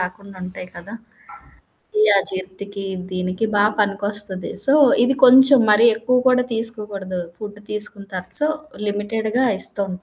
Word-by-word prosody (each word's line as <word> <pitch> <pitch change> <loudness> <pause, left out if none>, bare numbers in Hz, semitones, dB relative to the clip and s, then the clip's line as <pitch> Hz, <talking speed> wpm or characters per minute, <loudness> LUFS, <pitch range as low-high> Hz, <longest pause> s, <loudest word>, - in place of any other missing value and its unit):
రాకుండుంటాయి 185 -1 -8
కదా! 195 +6 -11 1.1
ఈ - - +4 0.2
అజీర్తికి 195 +1 -7 0.3
దీనికి 185 +2 -4
బా 205 - +3 0.2
పనికొస్తది. 205 -2 -3 0.2
సో, 275 - +3 0.3
ఇది 265 +2 0
కొంచెం 265 +2 +6
మరి 215 +2 +4
ఎక్కువ 240 +3 -1
కూడా 250 0 +2
తీసుకోకూడదు. 210 -5 -2 0.2
ఫుడ్ 205 -1 -9
తీసుకుంటారు. 200 -3 -4
సో, 300 - +1 0.4
లిమిటెడ్‌గా 220 +4 -2 0.2
ఇస్తుంటా. 190 -2 -3
205 Hz, 115 wpm, -19 LUFS, 190-225 Hz, 1.1 s, కొంచెం